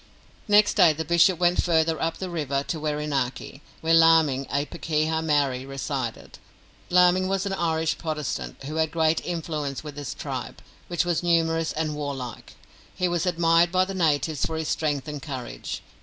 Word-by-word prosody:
Next 210 0 +5
day 165 -3 +5
the 160 +2 -4
bishop 170 +2 +4
went 175 +1 +2
further 160 -2 +1
up 165 0 -1
the 185 -2 -5
river 140 -4 -1
to 160 +2 -4
Wherinaki, 150 -3 -3 0.2
where 165 +1 +2
Laming, 160 -5 +5
a 140 +1 0
pakeha 160 0 -1
Maori, 145 -5 +1
resided. 135 -3 -5 0.5
Laming 180 +1 +4
was 195 +1 -1
an 195 - -2
Irish 160 -3 0
Protestant 150 -4 -4
who 150 +3 -5
had 160 -1 +1
great 160 0 +1
influence 155 -5 -4
with 150 -2 -9
his 145 -3 -5
tribe, - - -6 0.2
which 175 0 0
was 175 -2 0
numerous 165 -1 +1
and 155 -1 -2
warlike. 140 -5 -6 0.4
He 180 - 0
was 175 0 -1
admired 170 0 +3
by 185 0 +3
the 195 - -6
natives 155 -4 0
for 160 - -1
his 160 -1 -3
strength 145 -2 -1
and 150 -2 -5
courage. 130 - -6
160 Hz, 170 wpm, -25 LUFS, 145-170 Hz, 0.5 s, Next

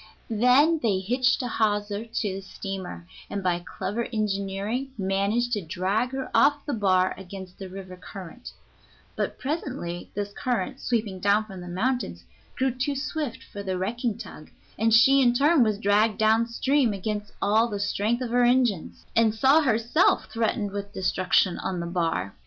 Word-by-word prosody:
Then 255 +9 +4
they 210 -5 +2
hitched 250 +7 +1
a - - -2
hawser 210 -1 0
to 220 -3 -2
the 195 - -5
steamer, 190 - -7 0.2
and 200 -1 -4
by 175 -1 +1 0.2
clever 230 +4 -2
engineering 210 +3 -2
managed 200 +5 0
to 210 - 0
drag 190 +8 -1
her 265 -1 -4
off 290 0 +4
the 290 - -2
bar 185 -4 +2
against 190 -1 -10
the 190 -1 -7
river 185 -1 -9
current; 185 +4 -10 0.6
but - - -2
presently 260 - -4
this 205 0 -3
current, 255 +3 -2
sweeping 215 -6 -1
down 205 +3 +3
from 190 -4 -9
the 175 - -8
mountains, 185 - -2 0.3
grew 265 0 +1
too 260 +4 -2
swift 295 -2 -4
for 205 - -8
the 190 -2 -2
wrecking 230 +4 -2
tug, 155 - -10 0.3
and 225 +1 +1
she 270 +5 +6
in 240 -2 +4
turn 295 +3 +4
was 215 -3 +2
dragged 210 +1 +2
down 220 +1 +3
stream 260 0 +1
against 210 +1 -4
all 220 +3 +3
the 205 -3 -4
strength 210 +4 0
of 240 - -4
her 245 0 +3
engines, 240 -7 +1
and 225 -1 +3
saw 275 +7 +5
herself 245 +4 +2
threatened 220 -3 0
with 200 0 -6
destruction 185 -1 +1
on 190 -2 -3
the 170 - -3
bar. 165 - -1
215 Hz, 170 wpm, -26 LUFS, 195-245 Hz, 0.6 s, she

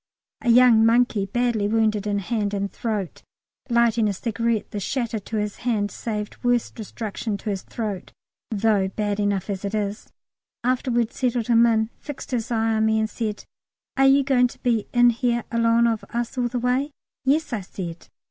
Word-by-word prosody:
A - - -1
young 235 -2 +7
monkey, 225 -3 +3
badly 235 -1 0
wounded 215 -1 +1
in 205 -1 0
hand 205 0 -1
and 200 0 -2
throat 215 -7 -3 0.5
(lighting 235 -2 +3
a - - -1
cigarette 230 +2 -1
the 205 - -3
shatter 230 +2 -2
to 210 +3 -7
his 210 -1 -2
hand 215 -5 -1
saved 210 +1 -5
worse 245 -1 +1
destruction 220 -1 -5
to 210 +1 -4
his 195 -2 -3
throat, 210 -5 -5 0.4
though 210 -2 +2
bad 205 +1 -2
enough 200 -2 0
as 195 -2 -4
it 200 +1 -2
is), 205 +1 -3 0.5
after 255 +2 0
we'd 235 -1 +1
settled 245 -3 0
him 235 0 +6
in, 220 0 +1
fixed 290 -2 -8
his 235 -2 -2
eye 225 -1 +1
on 220 0 +2
me 220 0 +2
and 220 0 -1
said, 215 -3 -4 0.5
"Are 270 0 +4
you 275 +1 +5
going 255 -2 +3
to - - -14
be 235 -4 +1
in 240 -1 +5
here 235 0 0
along 230 0 +3
of 225 -2 0
us 235 +1 -3
all 250 -1 0
the 245 +1 -3
way?" 250 +4 0 0.3
"Yes," 280 +1 +1
I 215 - -1
said. 175 -2 -7
225 Hz, 185 wpm, -23 LUFS, 210-240 Hz, 0.5 s, young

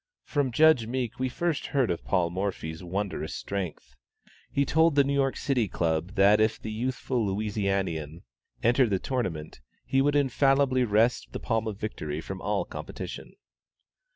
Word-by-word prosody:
From 145 -4 0
Judge 155 -3 +5
Meek 125 -1 -3
we 130 0 0
first 170 +4 -1
heard 130 -8 +1
of 85 -7 -3
Paul 85 +7 +1
Morphy's 90 -3 -3
wondrous 95 +3 -3
strength. 90 -10 -5 0.6
He 140 - +1
told 160 +2 +3
the 140 - +6
New 140 +1 -1
York 135 -1 +1 0.3
Club 85 +2 -1
that 100 +2 +5
if 110 0 +2
the 110 - -6
youthful 125 +1 -1
Louisianian 95 -6 -2 0.4
entered 120 +1 +4
the 100 - +2
tournament, 90 - -3 0.2
he 135 - +2
would 145 +1 +2
infallibly 135 -1 +3
wrest 110 +3 +2
the - - -4
palm 115 -1 -1
of 105 -3 -4
victory 80 -8 -4
from 95 +3 -7
all 105 0 0
competition. - - -7
110 Hz, 155 wpm, -27 LUFS, 95-130 Hz, 0.6 s, the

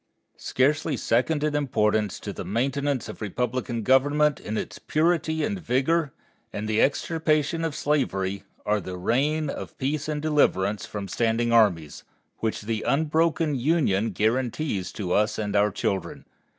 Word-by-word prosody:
Scarcely 145 +2 +1
second 145 +8 +1
in 150 -1 +1
importance 110 -7 +1
to - - -5
the - - -6
maintenance 135 +4 -1
of - - -9
republican 120 +2 -2
government 145 +4 +3
in 110 +1 -4
its - - -5
purity 160 0 +1
and 205 -3 -1
vigor 150 +2 +1 0.4
and 105 +1 -4
the 110 0 +2
extirpation 155 +1 +1
of 160 -3 -2
slavery, 100 -10 -1 0.2
are 105 0 +1
the 90 0 -6
reign 145 +11 +1
of - - -6
peace 140 +3 -2
and 150 -1 -1
deliverance 110 -10 +1
from 100 -2 -5
standing 115 +3 0
armies, 90 -10 +2 0.4
which 110 -1 -2
the 110 0 -2
unbroken 155 +1 +1
Union 125 - +1
guarantees 110 - -1
to 95 -4 -4
us 105 +3 +2
and 105 -2 -2
to 105 - +4
our 105 +1 +3
children. 95 -1 -3
130 Hz, 150 wpm, -25 LUFS, 105-150 Hz, 0.4 s, to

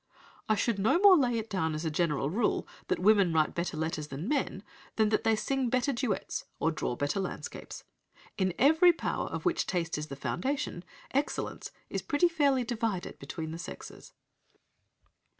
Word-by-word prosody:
"'I 215 - +4
should 220 -1 0
no 220 - +3
more 390 0 +8
lay 250 -7 +2
it 225 0 -3
down 160 -7 -1
as 155 +2 -4
a 160 - 0
general 150 -3 0
rule 215 +4 0 0.2
that - - +1
women 200 -2 +4
write 155 -1 +2
better 170 -2 -3
letters 155 -1 -2
than 145 +6 -5
men, 260 -8 -1 0.3
than 220 -1 +3
that 215 0 +1
they 225 -1 +3
sing 255 +4 -1
better 255 +3 +1
duets, 235 -5 -2
or 160 - +2
draw 140 -6 -2
better 145 +8 -1
landscapes. 190 - -6 0.5
In 185 -3 0
every 320 +6 +6
power, 335 - -2
of - - -5
which 355 -1 +1
taste 170 -4 -1
is 150 - -5
the 140 - -6
foundation, 175 - -2 0.3
excellence 280 +2 -2 0.2
is - - -3
pretty 320 +4 +2
fairly 285 -6 +2
divided 225 -6 -3
between 160 -2 -6
the 165 - -6
sexes.'" - - -9
210 Hz, 175 wpm, -30 LUFS, 165-260 Hz, 0.5 s, more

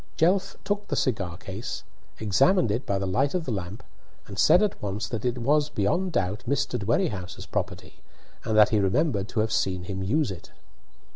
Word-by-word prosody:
Jelf 190 +4 +2
took 205 0 -2
the - - -1
cigar 100 -9 -1
case, 105 +6 -6 0.4
examined 110 - +3
it 115 +6 -2
by 100 - +1
the 95 - -2
light 135 - +1
of 175 -3 -1
the 130 - -2
lamp, 95 0 -5 0.4
and 100 -1 -8
said 180 - +6
at 210 - -1
once 100 +1 -3
that 110 0 -4
it 125 0 0
was 145 +5 +2
beyond 160 - 0
doubt 100 +2 -1
Mr. 130 -2 0
Dwerrihouse's 100 -3 -1
property, - - -4 0.4
and 110 -1 0
that 105 -1 +7
he 110 - +2
remembered 100 - +1
to 110 - 0
have 110 0 -1
seen 95 -3 0
him 95 +1 -4
use 125 +6 +1
it. 90 - -9
110 Hz, 190 wpm, -26 LUFS, 100-145 Hz, 0.4 s, that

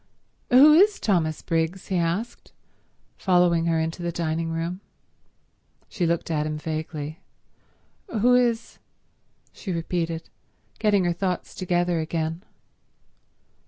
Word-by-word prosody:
"Who 275 +5 +8
is 400 +6 +5
Thomas 160 -7 0
Briggs?" 165 +3 -2
he 190 - 0
asked, 175 +7 -2 0.6
following 175 -3 +3
her 165 -1 +2
into 160 +2 -3
the 170 0 -2
dining 165 0 -2
room. 165 +3 -3 1.1
She 175 - -1
looked 170 0 -1
at 150 -1 0
him 155 0 -3
vaguely. 155 0 -5 0.9
"Who 245 - +2
is—?" 240 -2 +1 0.7
she 195 - -6
repeated, 165 -1 -2 0.5
getting 205 -3 +3
her 175 - +1
thoughts 180 0 -3
together 175 -2 0
again. 160 +2 -3
170 Hz, 115 wpm, -25 LUFS, 165-190 Hz, 1.1 s, Who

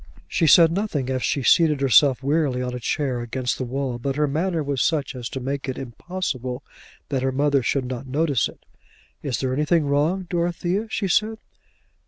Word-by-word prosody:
She 165 - +1
said 165 +2 +7
nothing 165 -9 -2
as 130 -1 -1
she 140 - 0
seated 155 0 +4
herself 135 0 +4
wearily 140 -2 +1
on 125 0 -3
a 125 - -4
chair 130 +1 -1
against 125 +1 -3
the - - -1
wall; 130 -1 -3
but 135 +2 -2
her 150 +1 +2
manner 160 +3 -1
was 140 -2 -1
such 150 -5 0
as 120 -2 -5
to 135 - -5
make 135 +1 -3
it 130 - -4
impossible 130 -1 -4 0.5
that 135 -2 -1
her 130 0 0
mother 140 +1 +2
should 130 +2 0
not 130 +1 -5
notice 140 -2 +1
it. - - -17 0.6
"Is 135 -4 -2
there 130 -1 -1
anything 150 +3 +2
wrong, 150 +7 +1
Dorothea?" 175 +4 -1
she 200 - -1
said. 215 +4 +1
140 Hz, 190 wpm, -23 LUFS, 130-165 Hz, 0.6 s, said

